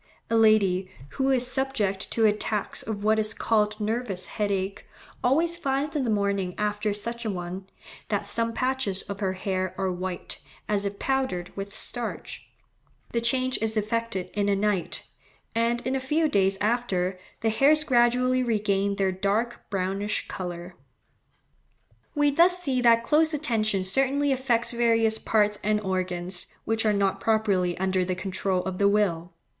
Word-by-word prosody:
A -, -, +3 dB
lady 200 Hz, -4 st, +3 dB, 0.2 s
"who 265 Hz, -, -1 dB
is 255 Hz, -2 st, +5 dB
subject 250 Hz, -7 st, -1 dB
to 225 Hz, -, +2 dB
attacks 210 Hz, 0 st, 0 dB
of 205 Hz, -2 st, -5 dB
what 220 Hz, +1 st, +3 dB
is 215 Hz, 0 st, +1 dB
called 210 Hz, -1 st, +1 dB
nervous 210 Hz, -4 st, -2 dB
headache, 200 Hz, -2 st, -2 dB, 0.4 s
always 325 Hz, +7 st, +3 dB
finds 285 Hz, -1 st, -2 dB
in 290 Hz, -, +1 dB
the -, -, -1 dB
morning 200 Hz, -3 st, 0 dB
after 210 Hz, 0 st, -1 dB
such 235 Hz, +3 st, -4 dB
an 215 Hz, -4 st, -2 dB
one, 180 Hz, +2 st, -6 dB, 0.4 s
that -, -, -1 dB
some 230 Hz, 0 st, -1 dB
patches 255 Hz, -5 st, 0 dB
of 200 Hz, -1 st, -7 dB
her 190 Hz, -2 st, -1 dB
hair 185 Hz, -1 st, -2 dB
are 190 Hz, -1 st, 0 dB
white, 180 Hz, 0 st, -5 dB, 0.3 s
as 205 Hz, -1 st, +1 dB
if 200 Hz, 0 st, -6 dB
powdered 260 Hz, -11 st, -2 dB
with 200 Hz, 0 st, -6 dB
starch. 240 Hz, -1 st, -4 dB, 0.6 s
The 235 Hz, -, 0 dB
change 255 Hz, +2 st, +1 dB
is 220 Hz, 0 st, 0 dB
effected 215 Hz, -4 st, -2 dB
in 205 Hz, -1 st, 0 dB
a 200 Hz, -, +3 dB
night, 200 Hz, -3 st, -1 dB, 0.5 s
and 230 Hz, +1 st, 0 dB
in 260 Hz, +1 st, 0 dB
a -, -, 0 dB
few 300 Hz, +5 st, +1 dB
days 195 Hz, -7 st, +2 dB
after, 200 Hz, -5 st, 0 dB, 0.2 s
the 225 Hz, -, +1 dB
hairs 295 Hz, +6 st, +4 dB
gradually 250 Hz, -1 st, +3 dB
regain 200 Hz, -4 st, 0 dB
their 195 Hz, -1 st, +1 dB
dark 200 Hz, +5 st, -2 dB
brownish 195 Hz, +1 st, -2 dB
colour." 175 Hz, -1 st, -6 dB, 1.4 s
We 290 Hz, 0 st, +3 dB
thus 345 Hz, +5 st, +5 dB
see 270 Hz, -8 st, +1 dB
that 230 Hz, -1 st, +5 dB
close 315 Hz, +3 st, +3 dB
attention 215 Hz, -9 st, +1 dB
certainly 270 Hz, +8 st, +1 dB
affects 250 Hz, -3 st, +1 dB
various 230 Hz, -2 st, +2 dB
parts 210 Hz, -1 st, +1 dB
and 210 Hz, +1 st, +2 dB
organs, 185 Hz, -2 st, -1 dB, 0.2 s
which 225 Hz, 0 st, 0 dB
are -, -, +4 dB
not 200 Hz, -2 st, +1 dB
properly 200 Hz, -6 st, +1 dB
under 190 Hz, 0 st, +1 dB
the 180 Hz, 0 st, -2 dB
control 185 Hz, 0 st, -1 dB
of 190 Hz, -1 st, -4 dB
the 200 Hz, 0 st, +4 dB
will. 180 Hz, -5 st, 0 dB
210 Hz, 160 wpm, -26 LUFS, 195-240 Hz, 1.4 s, is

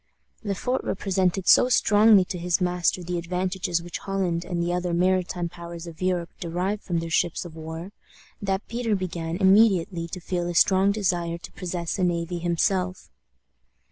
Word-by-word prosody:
Le 200 Hz, -2 st, -2 dB
Fort 250 Hz, +6 st, -1 dB
represented 190 Hz, -1 st, 0 dB
so 250 Hz, -, +6 dB
strongly 210 Hz, -4 st, +5 dB
to 180 Hz, -, -5 dB
his 175 Hz, 0 st, 0 dB
master 180 Hz, 0 st, 0 dB
the 175 Hz, 0 st, -2 dB
advantages 180 Hz, 0 st, -2 dB
which 175 Hz, -1 st, -6 dB
Holland 185 Hz, -4 st, -1 dB
and 175 Hz, -1 st, -4 dB
the 170 Hz, +1 st, 0 dB
other 180 Hz, -1 st, -1 dB
maritime 180 Hz, -1 st, +1 dB
powers 170 Hz, 0 st, -9 dB
of 170 Hz, 0 st, -11 dB
Europe 180 Hz, -2 st, -1 dB
derived 180 Hz, +5 st, -2 dB
from 175 Hz, -3 st, -2 dB
their 165 Hz, 0 st, -3 dB
ships 170 Hz, +1 st, 0 dB
of 165 Hz, -2 st, -10 dB
war, 160 Hz, +3 st, -7 dB, 0.5 s
that 195 Hz, 0 st, -2 dB
Peter 230 Hz, -2 st, -1 dB
began 170 Hz, -3 st, -3 dB
immediately 190 Hz, -3 st, +3 dB
to 180 Hz, -, -6 dB
feel 175 Hz, 0 st, -2 dB
a 175 Hz, -, -4 dB
strong 190 Hz, +3 st, +4 dB
desire 175 Hz, -5 st, -1 dB
to 170 Hz, -, -11 dB
possess 175 Hz, 0 st, -4 dB
a -, -, +1 dB
navy 175 Hz, 0 st, -1 dB
himself. 180 Hz, +2 st, -1 dB
180 Hz, 170 wpm, -25 LUFS, 170-190 Hz, 0.5 s, so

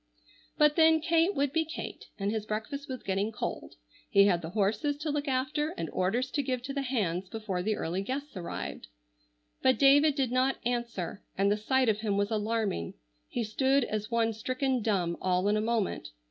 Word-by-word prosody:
But 300 Hz, +1 st, +4 dB
then, 320 Hz, 0 st, +6 dB
Kate 335 Hz, +4 st, +2 dB
would 280 Hz, 0 st, 0 dB
be 325 Hz, -, +3 dB
Kate, 320 Hz, +2 st, -7 dB
and 200 Hz, 0 st, -1 dB
his 215 Hz, -1 st, -3 dB
breakfast 275 Hz, +7 st, -4 dB
was 255 Hz, -2 st, -5 dB
getting 195 Hz, +3 st, -1 dB
cold. 210 Hz, -, -5 dB, 0.3 s
He 200 Hz, -, +6 dB
had 180 Hz, -4 st, +3 dB
the 160 Hz, -, -5 dB
horses 215 Hz, -, 0 dB
to 305 Hz, +1 st, -2 dB
look 290 Hz, 0 st, -2 dB
after 295 Hz, +4 st, -1 dB
and 165 Hz, -1 st, -4 dB
orders 235 Hz, +8 st, 0 dB
to 290 Hz, -, 0 dB
give 255 Hz, -2 st, -2 dB
to 275 Hz, +2 st, -4 dB
the 280 Hz, -, -1 dB
hands 195 Hz, -9 st, -1 dB
before 215 Hz, -5 st, -3 dB
the 215 Hz, +3 st, 0 dB
early 175 Hz, +2 st, -2 dB
guests 270 Hz, +6 st, -4 dB
arrived. 180 Hz, -2 st, -5 dB, 0.7 s
But 260 Hz, -3 st, +4 dB
David 285 Hz, +2 st, +6 dB
did 265 Hz, -4 st, 0 dB
not 255 Hz, +1 st, +2 dB
answer, 235 Hz, -6 st, -2 dB, 0.2 s
and 200 Hz, +1 st, +3 dB
the -, -, +3 dB
sight 255 Hz, +5 st, +1 dB
of 215 Hz, -1 st, +2 dB
him 210 Hz, -2 st, 0 dB
was 205 Hz, +2 st, 0 dB
alarming. 215 Hz, -, -1 dB, 0.3 s
He 240 Hz, -, -2 dB
stood 265 Hz, +5 st, +2 dB
as 215 Hz, -2 st, -3 dB
one 230 Hz, -1 st, +1 dB
stricken 255 Hz, +3 st, -1 dB
dumb 185 Hz, -6 st, 0 dB
all 185 Hz, +1 st, +1 dB
in 205 Hz, -, +3 dB
a 215 Hz, -, +1 dB
moment. 220 Hz, -, -1 dB
230 Hz, 195 wpm, -30 LUFS, 205-275 Hz, 0.7 s, then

